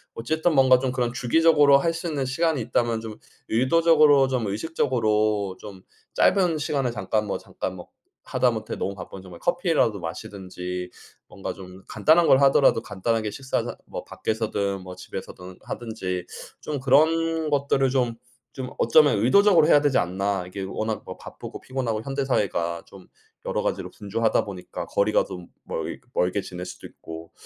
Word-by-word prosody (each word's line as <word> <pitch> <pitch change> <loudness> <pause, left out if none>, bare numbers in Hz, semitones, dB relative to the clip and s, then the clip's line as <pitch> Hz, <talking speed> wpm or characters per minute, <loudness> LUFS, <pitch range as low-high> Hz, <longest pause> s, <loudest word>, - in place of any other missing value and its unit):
어쨌든 160 +8 0
뭔가 130 -2 +6
좀 130 0 -1
그런 125 -2 -1
주기적으로 145 +3 +5
할 165 +3 0
수 165 +1 -5
있는 140 -4 -2
시간이 155 +3 0
있다면 115 0 0
좀 110 -1 -8 0.3
의도적으로, 145 +2 +5
좀 125 -4 -1
의식적으로 110 - 0
좀 100 -3 -10 0.3
짧은 180 -5 +3
시간을 140 -4 -1
잠깐 105 0 -1
뭐 100 - -2
잠깐 95 - -6
뭐 90 - -10 0.4
하다못해 - - 0
너무 100 - -3
바쁘면 95 0 -9
정말 90 -2 -12
커피라도 170 - +1
마시든지 90 0 -6 0.4
뭔가 - - -6
좀 95 0 -12
간단한 165 +1 +4
걸 135 - +6
하더라도 135 -4 +5
간단하게 110 +2 -2
식사 130 +5 -2
자 - - -6
뭐 - - -7
밖에서든 100 -3 -2
뭐 90 0 -9
집에서든 90 0 -9
하든지 95 -6 -4 0.4
좀 150 -2 -4
그런 160 +4 +3
것들을 140 -1 +2
좀 125 -3 0 0.4
좀 130 -2 -5
어쩌면 140 -1 +5
'의도적으로 175 - +5
해야 150 - +6
되지 145 -2 +2
않나?' 95 +1 -1
이게 95 +2 -6
워낙 110 +3 -3
뭐 - - -8
바쁘고 - - -10
피곤하고 125 -5 -3
현대 135 +1 -2
사회가 85 -9 -1
좀 95 -2 -15 0.4
여러 - - -1
가지로 - - -3
분주하다 110 +2 0
보니까 95 -3 -7
거리가 105 +2 +2
좀 90 -2 -8 0.2
멀 - - -4
이 - - -14 0.2
멀게 90 +3 +1
지낼 90 -1 -7
수도 - - -9
있고 80 0 -11
115 Hz, 355 characters per minute, -24 LUFS, 100-140 Hz, 0.4 s, 뭔가